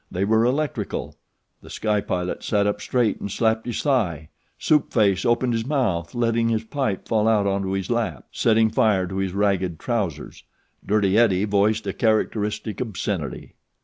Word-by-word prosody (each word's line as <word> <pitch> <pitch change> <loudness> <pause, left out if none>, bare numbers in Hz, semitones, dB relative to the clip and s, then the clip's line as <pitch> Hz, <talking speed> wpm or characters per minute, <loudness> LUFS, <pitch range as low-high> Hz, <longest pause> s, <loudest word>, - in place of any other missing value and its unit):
They 95 +2 -1
were 110 +2 +3
electrical. 140 +3 -2 0.5
The - - -14
Sky 105 -2 0
Pilot 90 -1 -3
sat 100 -2 +1
up 105 0 -1
straight 120 -5 0
and 100 - -5
slapped 110 +3 0
his 120 - -3
thigh. 90 - 0 0.3
Soup 150 -1 +2
Face 100 -5 +2
opened 120 +1 +2
his 115 -1 -1
mouth, 120 - -1
letting 115 -1 +1
his 110 -1 0
pipe 110 -4 -3
fall 110 -1 +1
out 105 -3 +3
into 95 -1 -1
his 95 +2 -3
lap, 110 - -2
setting 110 -1 +2
fire 105 -4 +2
to 95 +1 -6
his 95 -1 -2
ragged 95 -4 0
trousers. 95 - -3 0.4
Dirty 105 0 +2
Eddie 100 -4 +3
voiced 105 +1 +1
a 100 - -2
characteristic 110 0 -1
obscenity. 95 - -4
105 Hz, 165 wpm, -23 LUFS, 95-115 Hz, 0.5 s, were